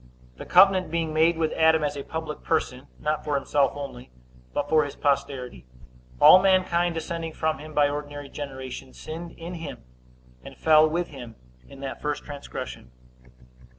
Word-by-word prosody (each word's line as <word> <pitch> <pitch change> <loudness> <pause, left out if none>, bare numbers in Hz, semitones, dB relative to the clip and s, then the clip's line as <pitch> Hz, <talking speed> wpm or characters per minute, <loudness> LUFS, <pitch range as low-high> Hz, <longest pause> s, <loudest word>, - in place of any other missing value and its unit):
The - - -9
covenant 185 -1 +5
being 165 -1 -2
made 160 +2 +3
with 160 -1 0
Adam 160 -1 +4
as 145 -1 -1
a 140 - -4
public 160 +1 -6
person, 135 -4 -1
not 150 0 -2
for 150 -1 -1
himself 140 0 +1
only, 135 -3 -8 0.4
but 145 - -2
for 155 0 +4
his 145 - -6
posterity, 130 - -2 0.5
all 185 - +9
mankind 180 -3 +2
descending 165 0 -4
from 155 0 -1
him 155 0 -10
by 145 -1 +5
ordinary 145 0 -5
generation, 130 -2 -7
sinned 165 +2 -8
in 170 +2 -8
him, 160 - -7 0.6
and - - -11
fell 155 0 +5
with 170 +2 -2
him 120 -5 -10 0.3
in 135 - -12
that 135 - -6
first 150 0 -2
transgression. 140 - -8
155 Hz, 160 wpm, -25 LUFS, 140-165 Hz, 0.6 s, all